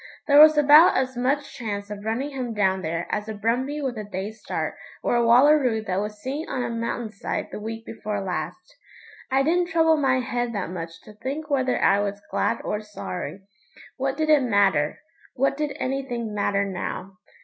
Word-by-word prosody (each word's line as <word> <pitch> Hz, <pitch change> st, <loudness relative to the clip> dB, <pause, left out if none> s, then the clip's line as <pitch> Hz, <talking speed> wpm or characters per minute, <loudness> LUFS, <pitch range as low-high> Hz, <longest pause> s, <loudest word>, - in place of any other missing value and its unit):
There 285 Hz, -1 st, +6 dB
was 310 Hz, 0 st, +9 dB
about 295 Hz, +3 st, +7 dB
as 260 Hz, 0 st, -1 dB
much 270 Hz, +4 st, -1 dB
chance 205 Hz, -3 st, -5 dB
of 205 Hz, -1 st, -7 dB
running 235 Hz, +7 st, -2 dB
him 250 Hz, -4 st, -4 dB
down 190 Hz, -2 st, +1 dB
there 165 Hz, 0 st, -2 dB
as 210 Hz, +1 st, -2 dB
a 220 Hz, -, -4 dB
brumbie 250 Hz, +8 st, -1 dB
with 250 Hz, -5 st, -3 dB
a -, -, -4 dB
day's 205 Hz, +2 st, -6 dB
start -, -, -3 dB, 0.3 s
or -, -, +1 dB
a 240 Hz, -, +3 dB
wallaroo 250 Hz, -1 st, +5 dB
that 190 Hz, -2 st, -1 dB
was 210 Hz, 0 st, -5 dB
seen 275 Hz, +8 st, -4 dB
on 250 Hz, -, -2 dB
a -, -, -3 dB
mountain 230 Hz, -1 st, -3 dB
side 200 Hz, -, -4 dB
the -, -, -6 dB
week 225 Hz, +1 st, -6 dB
before 210 Hz, -2 st, -4 dB
last. 195 Hz, -, -5 dB, 0.5 s
I 270 Hz, +1 st, +3 dB
didn't 350 Hz, +4 st, +2 dB
trouble 325 Hz, -1 st, +3 dB
my 265 Hz, -3 st, +2 dB
head 245 Hz, -1 st, -2 dB
that 185 Hz, -4 st, -3 dB
much 165 Hz, -2 st, -7 dB
to 215 Hz, -, -13 dB
think 285 Hz, +8 st, -5 dB
whether 260 Hz, -2 st, +1 dB
I 200 Hz, -, +4 dB
was 205 Hz, 0 st, -2 dB
glad 230 Hz, -, 0 dB
or 210 Hz, -, -2 dB
sorry. 200 Hz, -2 st, -6 dB, 0.6 s
What 270 Hz, +1 st, -1 dB
did 310 Hz, 0 st, +1 dB
it 300 Hz, -2 st, +6 dB
matter? 200 Hz, -, +2 dB, 0.4 s
What 275 Hz, +2 st, +1 dB
did 295 Hz, -1 st, -3 dB
anything 250 Hz, -4 st, -3 dB
matter 200 Hz, -1 st, +1 dB
now? 190 Hz, 0 st, -5 dB
235 Hz, 195 wpm, -24 LUFS, 205-275 Hz, 0.6 s, was